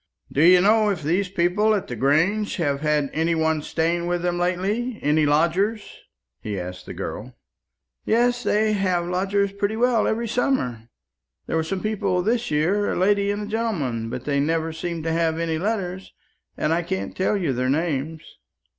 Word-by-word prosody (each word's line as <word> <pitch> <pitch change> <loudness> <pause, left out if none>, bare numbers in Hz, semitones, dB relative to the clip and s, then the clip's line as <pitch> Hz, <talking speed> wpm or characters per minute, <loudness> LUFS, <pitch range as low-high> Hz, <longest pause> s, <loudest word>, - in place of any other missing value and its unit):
"Do 140 - +1
you 180 +1 +7
know 215 +2 +4
if 180 -6 -2
these 180 +6 0
people 195 +4 +2
at 200 - -2
the 120 - -5
Grange 165 - +1
have 145 -6 -1
had 150 -2 +1
any 165 +2 +1
one 160 -1 +1
staying 170 +3 -1
with 175 0 -1
them 175 0 0
lately 200 +7 -1
any 150 +1 +3
lodgers?" 180 +9 +1 0.4
he 105 -3 -4
asked 90 0 -7
the - - -6
girl. - - -6 0.7
"Yes; 245 +2 +2
they 215 -1 +1
have 185 -4 0
lodgers 195 +3 0
pretty 200 +2 -2
well 240 -1 +2
every 230 +1 -1
summer. 125 - -1 0.6
There - - -3
were 160 - +2
some 185 +4 -4
people 200 -4 0
this 235 +4 0
year, 175 +8 +1
a - - -2
lady 200 +2 +2
and 205 0 -2
gentleman; 160 - -2
but 125 +2 -6
they 140 -1 0
never 160 +2 0
seemed 165 0 -4
to 165 - -1
have 165 -1 +1
any 165 -1 -1
letters, 190 -2 -3 0.5
and 155 - +1
I 170 - +1
can't 190 +2 -4
tell 190 +3 +1
you 170 -8 -1
their 130 +1 -1
names." 155 +1 -1
175 Hz, 180 wpm, -23 LUFS, 155-205 Hz, 0.7 s, you